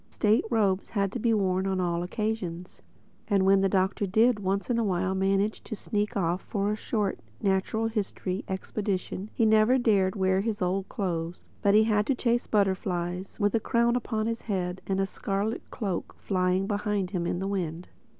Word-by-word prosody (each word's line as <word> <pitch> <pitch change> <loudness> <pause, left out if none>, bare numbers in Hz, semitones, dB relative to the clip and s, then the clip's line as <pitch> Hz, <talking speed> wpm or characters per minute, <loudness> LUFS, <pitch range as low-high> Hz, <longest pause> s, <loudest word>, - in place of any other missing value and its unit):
State 215 +1 +2
robes 200 -5 +1
had 200 -3 0
to 245 - -4
be 230 +1 +2
worn 190 -3 +1
on 190 -1 0
all 170 -1 0
occasions. 185 -3 -4 0.5
And 200 -3 +3
when 195 0 +5
the 195 - +3
Doctor 190 +1 +1
did 220 +4 +3
once 195 0 -1
in 240 -2 +1
a - - +2
while 190 -2 0
manage 195 +2 +1
to 220 - -5
sneak 210 +2 -2
off 175 -1 0
for 200 -1 -1
a - - 0
short, 210 -2 -2 0.2
natural 195 +3 0
history 200 -3 -2
expedition 195 0 -3
he 230 - +3
never 220 +3 +5
dared 200 -6 +3
to 210 - -7
wear 190 0 +3
his 215 0 -2
old 185 +1 -1
clothes, 170 -3 -4
but 200 0 +4
had 215 -1 +4
to 275 - +2
chase 240 -1 +1
his - - -22
butterflies 190 -2 -1
with 205 -1 +2
a 230 - +3
crown 235 +2 +2
upon 220 -3 -1
his 230 0 -2
head 185 -3 -2
and 195 0 0
a 195 - +2
scarlet 200 +3 -2
cloak 195 -7 -4
flying 185 0 +1
behind 205 -2 -1
him 175 -3 -1
in - - -1
the 190 +2 -2
wind. 175 -3 -3
195 Hz, 190 wpm, -28 LUFS, 185-215 Hz, 0.5 s, when